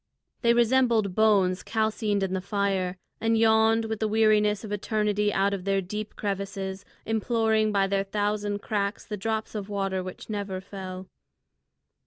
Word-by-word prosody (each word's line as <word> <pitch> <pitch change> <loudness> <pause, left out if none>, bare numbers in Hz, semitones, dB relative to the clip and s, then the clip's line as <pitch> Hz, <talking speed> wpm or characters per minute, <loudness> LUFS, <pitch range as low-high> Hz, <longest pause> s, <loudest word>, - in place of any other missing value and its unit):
They 235 -1 +4
resembled 235 -4 +3
bones 195 -3 +3
calcined 215 -2 0
in 190 -1 -1
the 190 - -1
fire, 195 -2 -1 0.2
and 225 0 +2
yawned 225 0 +4
with 220 -1 -3
the 220 - +1
weariness 210 -1 +3
of 215 - -7
eternity 210 0 0
out 200 0 +1
of 195 -2 -3
their 195 0 +1
deep 210 +3 -5
crevices, 195 -1 -4 0.2
imploring 220 -1 +1
by 200 -1 +2
their 195 0 0
thousand 205 0 -1
cracks 205 -1 -2
the 210 - -4
drop 220 +2 -3
of 210 -2 -5
water 195 -2 -1
which 185 0 -8
never 200 -3 -3
fell. 190 -1 -7
205 Hz, 155 wpm, -27 LUFS, 195-220 Hz, 0.2 s, They